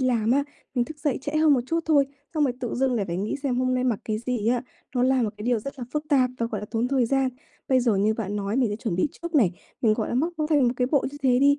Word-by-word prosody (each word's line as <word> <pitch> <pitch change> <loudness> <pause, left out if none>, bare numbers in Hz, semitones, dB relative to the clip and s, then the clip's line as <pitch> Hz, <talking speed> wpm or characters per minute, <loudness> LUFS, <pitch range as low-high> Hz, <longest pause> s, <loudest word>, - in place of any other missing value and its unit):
làm 235 -4 +1
á, 280 +3 +3 0.3
mình 245 -1 +2
thức 310 +1 -10
dậy 290 -2 0
trễ 290 - -4
hơn 310 -1 +5
một 250 - +2
chút 330 +4 0
thôi, 285 -3 +4 0.3
xong 300 -1 +3
rồi 255 - +1
tự 245 - -3
dưng 260 0 +1
lại 210 - 0
phải 170 - -3
nghĩ 200 +7 -2
xem 265 -4 0
hôm 255 0 +1
nay 255 0 0
mặc 235 -5 +1
cái 215 -1 -1
gì 235 -3 0
á, 245 0 +1 0.3
nó 245 - +2
là 260 -1 +3
một 215 - 0
cái 210 - -8
điều 240 -2 +2
rất 275 +4 -7
là 245 - -4
phức 300 0 -1
tạp 260 -4 +3
và, 230 - 0
gọi 215 -3 -4
là, 210 - -6
tốn 230 +2 0
thời 260 -3 +2
gian. 270 +1 +2 0.4
Bây 260 -1 +4
giờ 230 -5 +2
như 210 +3 +2
bạn 210 -2 -3
nói, 200 +2 -2
mình 255 -3 +3
sẽ 205 - -2
chuẩn 220 -5 -3
bị 240 - +2
trước 340 -1 -5
này, 215 - +4 0.3
mình, 215 -3 +4
gọi 220 - -2
là, - - -2
móc 320 +8 +1 0.2
theo 295 -2 +4
một 240 -1 +3
cái 250 0 +1
bộ 285 -4 +3
như 290 - -10
thế 250 -2 +4
đi. 285 +2 +4
250 Hz, 315 wpm, -25 LUFS, 225-275 Hz, 0.4 s, hơn